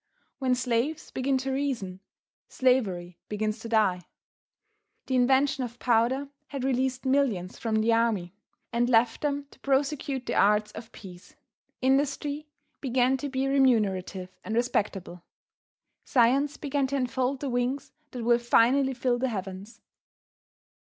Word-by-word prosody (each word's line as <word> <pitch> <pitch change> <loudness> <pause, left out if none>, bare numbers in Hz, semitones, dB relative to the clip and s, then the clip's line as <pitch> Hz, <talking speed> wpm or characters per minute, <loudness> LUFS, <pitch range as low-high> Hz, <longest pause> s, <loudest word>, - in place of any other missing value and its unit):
When 255 -2 +2
slaves 250 +5 -1
begin 265 +1 0
to 265 +1 -3
reason, 255 -10 -2 0.5
slavery 190 -10 0
begins 215 +1 -2
to 230 - -8
die. 210 -5 +2 1.0
The 260 - -1
invention 265 +2 +3
of 240 -1 -6
powder 245 +4 +1 0.2
had 275 -3 -5
released 260 0 0
millions 255 -10 0
from 225 -2 -1
the 230 +1 +3
army, 220 -6 +1 0.4
and 240 +1 +1
left 230 -1 +3
them 285 -1 -1
to - - -19
prosecute 275 -1 -1
the - - -2
arts 210 +1 +3
of 225 0 -10
peace. 190 +9 -13 0.5
Industry 285 +2 0 0.3
began 255 -1 +2
to 285 +2 -4
be 265 0 -1
remunerative 200 -9 +1
and 220 - -3
respectable. 200 -7 -1 0.8
Science 270 +4 +2
began 285 -2 -1
to 280 - -3
unfold 260 0 -1
the 280 - -3
wings 250 +3 -1 0.2
that 245 -3 -6
will 235 +1 +4
finally 255 +3 +3
fill 245 -1 0
the 260 +1 0
heavens. 195 +2 -6
250 Hz, 135 wpm, -27 LUFS, 220-270 Hz, 1.0 s, will